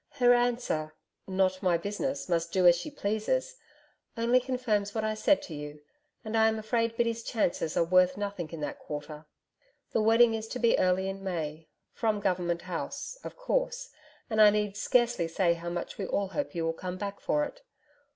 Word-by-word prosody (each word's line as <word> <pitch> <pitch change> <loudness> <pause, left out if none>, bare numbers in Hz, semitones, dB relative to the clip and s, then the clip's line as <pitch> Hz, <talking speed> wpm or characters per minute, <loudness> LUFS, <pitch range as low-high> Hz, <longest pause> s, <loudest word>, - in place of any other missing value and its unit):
Her 245 -1 +5
answer: 240 -11 0 0.3
"Not 185 -1 +1
my 180 -3 +3
business, 210 +10 -3
must 170 -1 0
do 185 -1 +2
as 175 -1 +8
she 175 - -5
pleases," 290 - -1 0.6
only 235 +2 +4
confirms 245 -5 -1
what 220 - 0
I 215 0 0
said 285 +7 +2
to 165 - -8
you, 150 0 -7 0.5
and 220 +1 -3
I 220 0 +5
am 220 0 +1
afraid 230 +1 -1
Biddy's 230 -1 0
chances 195 -8 -1
are - - +5
worth 185 +2 +4
nothing 200 -5 -4
in 165 -1 -7
that 145 - -4
quarter. 150 +1 -7 0.6
The 225 - +1
wedding 225 +1 +5
is 220 0 -3
to 250 - -5
be 235 -2 +3
early 185 +1 +2
in 195 0 -5
May, 160 -4 -4 0.3
from 220 -2 0
Government 175 -3 -1
House, 185 - -5
of - - -8
course, - - -1 0.4
and 220 -2 +2
I 210 - +9
need 210 -1 0
scarcely 235 -5 +2
say 170 +1 +2
how 170 0 -6
much 175 +3 -5
we 195 - -2
all 200 -1 -1
hope 285 -2 -3
you 165 -1 -1
will 165 - 0
come 180 +2 -5
back 200 +1 -5
for 295 - +1
it. - - -10
205 Hz, 190 wpm, -29 LUFS, 175-235 Hz, 0.6 s, I